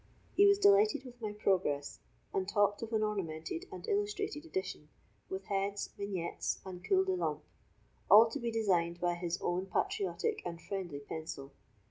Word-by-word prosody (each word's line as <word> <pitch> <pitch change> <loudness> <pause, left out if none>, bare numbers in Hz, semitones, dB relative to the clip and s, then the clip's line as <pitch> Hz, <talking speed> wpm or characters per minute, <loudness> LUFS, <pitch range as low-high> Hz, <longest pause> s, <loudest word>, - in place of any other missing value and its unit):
He 405 - +7
was 400 0 +6
delighted 405 -6 +5
with 245 -1 -12
my 215 -2 -2
progress, 185 -9 0 0.3
and 190 0 0
talked 205 0 +2
of 230 0 -5
an 220 -1 +2
ornamented 195 - -3
and - - -8
illustrated 410 -6 -1
edition, 190 - -4 0.4
with 190 0 -5
heads, 200 +1 -1
vignettes, 190 -4 -3
and 180 -1 -8
culs 380 -1 +3
de 380 - +1
lampe, 360 - -2 0.7
all 220 +3 +10
to - - -3
be 235 - -1
designed 180 -7 +1
by 175 0 +1
his 175 0 -3
own 180 +2 0
patriotic 410 - -1
and 170 -1 -5
friendly 175 -7 -5
pencil. 140 -2 -6
200 Hz, 160 wpm, -33 LUFS, -, 0.7 s, all